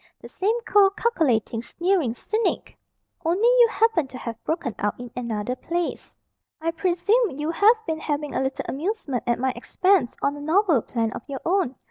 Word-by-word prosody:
The - - -11
same 435 +5 0
cold, 400 -2 +4
calculating, 255 - +1
sneering 340 -2 0
cynic. 435 - -2 0.5
Only 360 +8 +2
you - - +6
happen 450 -10 +2
to 255 - -9
have 230 -2 -7
broken 310 -7 -2
out 205 +2 -1
in 245 -1 -8
another 235 -1 -3
place. 345 +5 -3 0.5
I 330 +1 -1
presume 365 - +1
you 300 +2 -1
have 425 +7 +5
been 320 -1 -2
having 295 -2 -3
a - - 0
little 265 0 -2
amusement 295 - -3
at 240 - +2
my 260 +1 0
expense 375 -10 +1
on 280 - +1
a 290 - -8
novel 325 - +3
plan 225 -1 -2
of - - -6
your 275 -2 -5
own. 350 -7 +1
320 Hz, 175 wpm, -24 LUFS, 255-395 Hz, 0.5 s, you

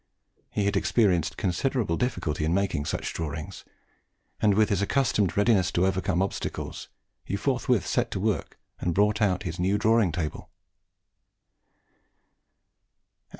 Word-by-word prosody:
He 100 - -1
had 100 - +1
experienced 90 -9 +2
considerable 100 +1 0
difficulty 80 - -2
in 80 +3 +1
making 95 -7 0
such - - -3
drawings, 75 -2 -5 0.8
and 105 -2 +4
with 110 +1 +3
his 100 -2 +1
accustomed 105 -4 +1
readiness 105 -3 +3
to 90 - +2
overcome 95 -1 +1
obstacles, 100 - -5 0.3
he - - -3
forthwith 125 -1 0
set - - 0
to - - -3
work 100 -5 -2 0.2
and 85 -2 -1
brought 105 +2 +2
out 95 -4 +2
his 85 -1 -5
new 95 +3 +2
drawing 110 -3 +3
table. 80 -2 -4
100 Hz, 130 wpm, -27 LUFS, 85-110 Hz, 0.8 s, and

